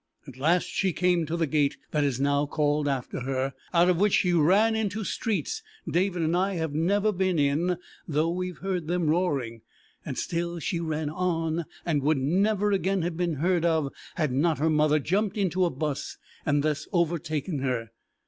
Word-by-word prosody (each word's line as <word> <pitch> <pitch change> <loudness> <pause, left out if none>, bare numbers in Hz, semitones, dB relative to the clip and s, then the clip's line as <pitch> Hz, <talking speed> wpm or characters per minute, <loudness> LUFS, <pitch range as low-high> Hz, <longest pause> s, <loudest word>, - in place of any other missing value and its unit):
At 135 - -10
last 165 +6 +3
she 190 -3 -1
came 175 -2 +1
to 165 +3 -2
the 165 - +2
gate 145 -1 +1
that 150 -1 +1
is 135 -3 0
now 140 +1 +2
called 150 0 +1
after 135 -3 -2
her, 135 +1 -2 0.2
out 175 0 +4
of 180 -2 +3
which 205 0 +3
she 180 -2 +2
ran 195 +8 +4
into 220 -1 -1
streets 225 - -2 0.3
David 180 -1 +1
and 160 +2 +1
I 190 +2 +1
have 160 -3 -2
never 200 +7 +2
been 185 -2 0
in 155 +5 +1 0.3
though 160 +1 +1
we 180 +1 -2
have 180 - -8
heard 185 -4 -3
them 175 -2 +1
roaring, 140 -10 -1 0.4
and - - -5
still 170 0 -2
she 170 +2 -2
ran 155 -2 -2
on 165 -1 -1 0.2
and 155 -4 +1
would 150 +2 +2
never 200 +9 +2
again 195 -2 +1
have 175 0 -2
been 170 -2 -1
heard 175 +3 +1
of 160 -5 +1 0.2
had 155 -5 0
not 155 +5 +2
her 160 +3 +1
mother 150 0 +3
jumped 195 +7 0
into 185 -2 +1
a - - +2
bus 145 -1 -4 0.3
and 145 -1 +2
thus 155 -1 -1
overtaken 170 -3 -1
her. 125 -4 -2
165 Hz, 190 wpm, -27 LUFS, 150-180 Hz, 0.4 s, out